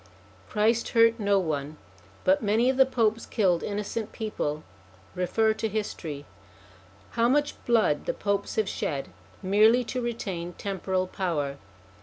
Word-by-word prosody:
Christ 225 +2 +1
hurt 230 0 +5
no 200 -1 +3
one, 155 -4 -2 0.5
but 190 +1 +3
many 225 +4 +3
of 260 - -5
the 265 -1 +6
Popes 225 -3 0
killed 185 -6 +2
innocent 210 +2 -3
people: 155 -9 -3 0.5
refer 220 +5 +1
to 220 0 -2
history. 165 -9 -4 0.9
How 235 +1 +2
much 290 +2 +2
blood 220 -11 +2
the - - +1
Popes 200 -1 -1
have 215 -2 +1
shed 140 -7 -3 0.3
merely 215 +6 +5
to 250 +2 -3
retain 190 -7 -4
temporal 190 0 -2
power 155 -7 -2
205 Hz, 135 wpm, -27 LUFS, 180-230 Hz, 0.9 s, the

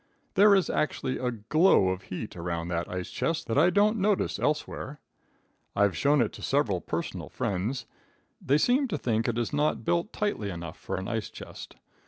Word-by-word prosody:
There 200 +1 +7
is 190 - +2
actually 130 -3 -1
a 125 - 0
glow 120 - +3
of 95 0 -2
heat 95 +3 -6
around 85 -1 -3
that 85 0 -2
ice 90 0 -4
chest 165 0 -1
that 115 - -1
I 170 +4 +6
don't 210 +4 +3
notice 200 0 +1
elsewhere. 150 -1 -2 0.8
I've 100 -1 +3
shown 145 -1 +3
it 115 - +1
to - - -10
several 115 -11 +1
personal - - -4
friends. 100 +7 -2 0.6
They 140 +3 +3
seem 255 - +3
to 220 - -2
think 115 -1 0
it 120 -1 0
is 120 +4 -1
not 150 +1 +1
built 170 +4 +1
tightly 205 - -2
enough 85 -3 -7
for - - -4
an 95 - -4
ice 115 -2 -2
chest. - - -10
130 Hz, 185 wpm, -28 LUFS, -, 0.8 s, There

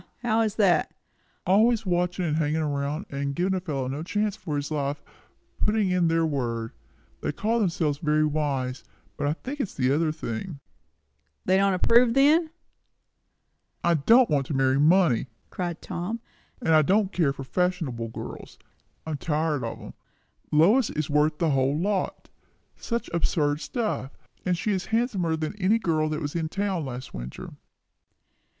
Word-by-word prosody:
How 225 -1 +2
is 220 -2 0
that?" 195 -5 +3 0.5
"Always 220 +4 +3
watching, 180 0 0
and 155 -2 0
hanging 155 0 0
around, 145 +4 -2
and 140 0 -3
giving 185 +4 +1
a 190 - 0
fellow 145 -8 -3
no 140 +3 -4
chance 210 +4 -1
for 170 -8 -5
his 145 +1 -3
life, 145 -1 -2
and - - -13
putting 210 -3 +2
in 180 -2 +2
their 165 0 +2
word. 120 -6 -2 0.5
They - - -1
call 230 +2 0
themselves 165 -7 0
very 155 0 +2
wise, 140 -4 -2 0.3
but 145 - -2
I 145 - +2
think 270 - -7
it - - +2
is - - -15
the 130 -1 +1
other 155 +2 +2
thing." 155 +2 -5 0.9
"They 185 - +3
don't 195 -1 +3
approve, 230 +5 +4
then?" 310 +4 +5 1.3
"I 170 - +3
don't 225 - +5
want 140 -3 0
to 150 - -3
marry 135 0 +2
money!" 155 -5 +4 0.2
cried 175 -2 -4
Tom; 185 +7 -4 0.4
"and 160 - +3
I 155 - +7
don't 195 +5 +2
care 160 -6 +2
for 135 -1 -7
fashionable 160 -7 -1
girls. 115 - -8 0.5
I'm 155 -2 -3
tired 150 -2 -1
of 115 - -5
'em. - - -10 0.6
Lois 200 - +4
is 155 -1 -3
worth 150 +1 +2
the 165 -1 +1
whole 135 +1 +2
lot. 190 +3 -2 0.5
Such 235 0 -3
absurd 150 -3 +1
stuff! 215 - -3 0.3
And 180 -1 +2
she 210 - -1
is 190 -2 -1
handsomer 215 -8 0
than 155 +4 -4
any 200 +5 +4
girl 155 -7 0
that 155 +1 -3
was 145 - -3
in 160 -2 -1
town 195 -4 -2
last 130 0 -7
winter." - - -7
160 Hz, 170 wpm, -26 LUFS, 145-195 Hz, 1.3 s, I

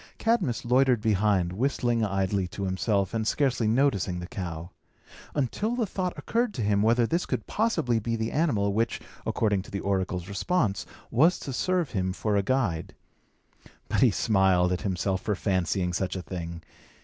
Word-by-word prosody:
Cadmus 195 - 0
loitered 125 0 +4
behind, 105 -4 +1
whistling 120 0 0
idly 95 -2 0
to 100 - -6
himself, 95 +1 0
and 110 -1 -1
scarcely 125 -3 +1
noticing 110 -7 +1
the 90 - -5
cow; 85 -2 -6 0.6
until 175 - -1
the 240 -2 0
thought 185 -2 -3
occurred 235 -1 -1
to 120 - -2
him, 100 -1 +2
whether 115 +2 +4
this 170 +9 -1
could 125 -4 -2
possibly 160 - +1
be 115 +2 -2
the 110 0 -2
animal 110 -11 +1
which, 115 +3 0 0.3
according 105 -3 +1
to 95 - -13
the 100 - -3
oracle's 95 -2 -1
response, 100 - 0 0.2
was 160 +10 +4
to 135 - -6
serve 180 +3 0
him 95 -2 -1
for 105 +1 -1
a 100 - +3
guide. 100 -8 -1 0.9
But - - +1
he - - +7
smiled 95 -4 +3
at 90 - -1
himself 95 -1 -1
for 105 - -1
fancying 90 -2 0
such 95 +1 -1
a 90 - -4
thing. 85 -2 -6
105 Hz, 170 wpm, -27 LUFS, 95-130 Hz, 0.9 s, he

